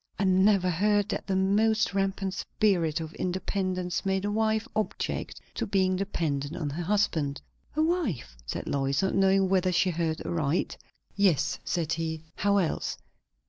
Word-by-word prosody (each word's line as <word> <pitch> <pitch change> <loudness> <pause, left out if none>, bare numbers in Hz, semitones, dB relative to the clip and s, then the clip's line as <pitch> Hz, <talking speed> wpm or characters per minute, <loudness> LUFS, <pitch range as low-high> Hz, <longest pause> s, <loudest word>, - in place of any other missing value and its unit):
"I - - 0
never 190 0 +4
heard 205 +3 +2
that - - -3
the 195 - 0
most 210 +3 +2
rampant 195 -1 -1
spirit 175 -6 +1
of 160 0 -6
independence 185 -1 -2
made 190 0 0
a 205 - 0
wife 220 0 +1
object 215 0 -2
to - - -3
being 190 -2 +2
dependent 160 -6 -2
on 155 -5 -3
her 160 +5 -4
husband." 165 -7 0 0.4
"A 310 - +3
wife?" 265 - -1
said - - -4
Lois, 135 +2 0
not 190 - +1
knowing 195 0 +4
whether 185 -1 +2
she 180 +1 +2
heard 160 -1 -2
aright. 160 -1 0 0.4
"Yes," 195 -7 +2
said 165 -2 -1
he. 160 -1 -3
"How 200 0 +2
else? 175 -5 -1
190 Hz, 155 wpm, -28 LUFS, 165-200 Hz, 0.4 s, never